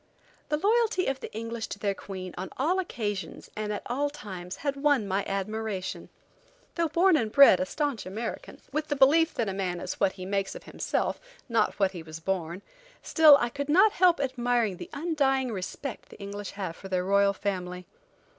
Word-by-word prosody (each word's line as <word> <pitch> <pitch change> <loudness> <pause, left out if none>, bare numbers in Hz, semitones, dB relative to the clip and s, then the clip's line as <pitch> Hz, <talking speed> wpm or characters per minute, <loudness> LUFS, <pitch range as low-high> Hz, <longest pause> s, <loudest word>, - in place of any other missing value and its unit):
The 300 - +1
loyalty 435 +1 +2
of 270 0 -1
the - - -7
English 230 +1 -4
to - - -6
their 200 -1 0
Queen 185 -2 -7
on 185 +1 -5
all 335 +8 +1
occasions, 210 - -4
and 210 0 -3
at 205 - -4
all 285 +4 0
times, 190 -10 -7
had 280 -1 +1
won 280 -6 +2
my 195 +1 0
admiration. 200 0 -3 0.6
Though 335 -1 +1
born 350 +3 +4
and 225 -7 0
bred 280 -9 +8
a 185 - -1
staunch 285 -6 -2
American, 220 +4 -6
with 305 0 -2
the 290 - -1
belief 310 +5 +4
that 230 - 0
a 195 - -2
man 185 -2 -2
is 185 - -5
what 190 - +2
he 185 -2 -8
makes 195 0 -1
of - - -9
himself, - - -2 0.3
not 230 -3 +1
what 195 -2 +3
he 175 -3 -7
was 160 0 -9
born, 180 +1 -3 0.4
still 310 -3 +7
I 240 - 0
could 285 +3 -5
not 385 +8 +6
help 355 -4 +4
admiring 245 -6 0
the - - -8
undying 275 -5 0
respect 215 +7 -6
the - - -13
English 200 0 -6
have 190 -5 -4
for 195 - -10
their 185 -1 0
royal 200 +1 +4
family. 180 -2 -4
220 Hz, 195 wpm, -28 LUFS, 195-285 Hz, 0.6 s, bred